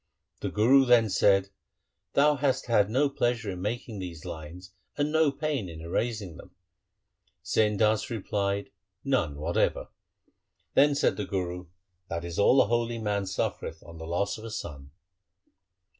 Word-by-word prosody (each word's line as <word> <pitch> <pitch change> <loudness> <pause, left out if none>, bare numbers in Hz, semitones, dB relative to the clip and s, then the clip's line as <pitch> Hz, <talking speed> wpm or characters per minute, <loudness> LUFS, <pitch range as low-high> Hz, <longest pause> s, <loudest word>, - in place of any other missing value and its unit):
The - - -3
Guru 130 +6 +5
then 115 -4 +4
said, 95 0 +3 0.3
' - - -54
Thou 145 +1 +4
hast 135 -1 0
had 105 -4 +3
no 135 +6 +2
pleasure 120 -6 -1
in 90 -1 -6
making 110 +1 -4
these 85 -4 -7
lines 85 +4 -9 0.2
and 145 +1 0
no 160 -2 +3
pain 140 - -2
in 80 -1 -9
erasing 95 +2 -3
them.' - - -14 0.9
Sain 105 -1 +1
Das 110 +3 +2
replied, 100 -3 -2 0.2
' 90 - -54 0.2
None 75 -3 -4
whatever.' 80 +4 0 0.8
Then 145 0 +5
said - - +1
the 105 - -2
Guru, 90 -2 -4 0.2
' 90 0 -46
That 85 0 -3
is 85 +1 -5
all 125 +6 +5
a - - -3
holy 120 +1 0
man 105 -3 -1
suffereth 95 - -3
on 85 0 -12
the 80 - -7
loss 100 +5 -1
of - - -11
a 115 - -6
son.' 70 -10 -7
105 Hz, 165 wpm, -28 LUFS, 90-120 Hz, 0.9 s, Guru